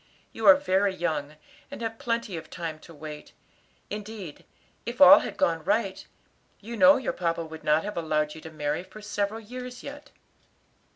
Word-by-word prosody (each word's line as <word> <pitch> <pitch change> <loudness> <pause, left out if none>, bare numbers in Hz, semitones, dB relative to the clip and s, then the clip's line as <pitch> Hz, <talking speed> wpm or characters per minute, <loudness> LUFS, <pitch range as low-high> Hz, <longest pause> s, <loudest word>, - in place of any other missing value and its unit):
You - - -1
are 290 - +11
very 200 -8 +1
young, 155 -4 -2 0.3
and 280 - -8
have 225 0 -4
plenty 230 -5 -2
of 160 -1 -8
time 165 -3 -5
to 170 - -15
wait; 150 -1 -9 0.6
indeed, 205 -6 -7 0.4
if 240 +1 -6
all 285 0 +10
had - - -6
gone 165 - +1
right, 195 0 -1 0.5
you 230 +3 -7
know 280 +4 +7
your 260 - -2
papa 170 -1 -1
would 160 0 -10
not 155 +1 +3
have 210 -1 -5
allowed 155 -2 0
you 160 - -11
to 160 - -9
marry 150 0 -2
for 190 +3 -13
several 205 +1 -2
years 250 +3 -8
yet." 290 +1 -9
195 Hz, 175 wpm, -27 LUFS, 160-235 Hz, 0.6 s, are